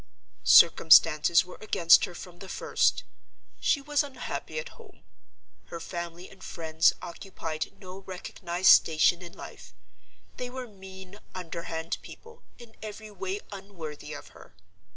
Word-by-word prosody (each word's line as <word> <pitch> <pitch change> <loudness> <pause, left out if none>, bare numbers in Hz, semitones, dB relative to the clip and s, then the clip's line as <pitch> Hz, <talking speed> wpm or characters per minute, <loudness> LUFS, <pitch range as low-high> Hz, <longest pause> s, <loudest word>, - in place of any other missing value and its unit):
"Circumstances 165 +1 +6
were 180 - -12
against 170 -5 +5
her 180 - -11
from 175 0 -11
the 195 - -10
first. - - +1 0.6
She 285 - +1
was 295 +1 +1
unhappy 285 - -6
at 485 0 -4
home. 450 -5 -18 0.6
Her 170 - -8
family 170 +1 -7
and 190 -1 -16
friends 160 0 +1
occupied 165 -3 -6
no 185 -1 -10
recognized 185 -1 -1
station 165 +2 +4
in 175 -1 -10
life: - - -12 0.6
they 250 - -5
were 255 0 -7
mean, 190 -1 -12 0.2
underhand 165 -2 -5
people, 460 0 -14 0.2
in 235 -2 -14
every 215 0 -8
way 195 0 -4
unworthy 175 -7 -8
of 145 - -9
her. - - -17
185 Hz, 130 wpm, -28 LUFS, 170-210 Hz, 0.6 s, Circumstances